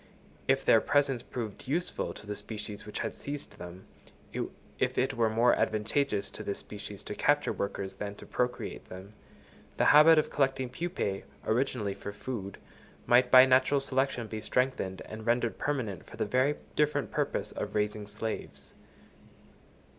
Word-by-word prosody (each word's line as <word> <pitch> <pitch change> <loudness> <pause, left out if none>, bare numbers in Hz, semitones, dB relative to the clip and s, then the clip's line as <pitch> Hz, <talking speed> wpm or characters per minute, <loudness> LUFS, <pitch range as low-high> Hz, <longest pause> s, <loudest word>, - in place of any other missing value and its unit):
If - - +2
their - - +6
presence 140 -4 +2
proved 115 -4 -6
useful 170 +6 -1
to - - -10
the 105 0 -4
species 105 -1 -7
which 105 - -4
had - - -2
seized 145 0 -7
them—if 90 +2 -6
it - - +2
were 115 -1 +2
more 115 +3 +4
advantageous 110 0 0
to - - -7
this 100 - -3
species, 105 -1 -8
to - - -5
capture 145 +7 +2
workers 100 -1 -3
than 100 0 -5
to - - -11
procreate 125 0 -2
them—the 95 +3 -7
habit 155 +2 +8
of 155 - +2
collecting 135 -2 +1
pupæ, 165 - -2 0.2
originally 110 -3 0
for 100 - -7
food, 100 -2 -5 0.5
might 125 +1 +5
by 130 0 +10
natural 130 +2 +4
selection 135 -3 0
be 110 0 -5
strengthened 125 -8 -1
and 110 +1 -8
rendered 120 0 +1
permanent 120 - -2
for - - -11
the - - 0
very 130 +3 +2 0.2
different 150 0 +1
purpose - - -1
of - - -5
raising 105 0 -1
slaves. 110 +2 -5
115 Hz, 150 wpm, -30 LUFS, 105-135 Hz, 0.5 s, by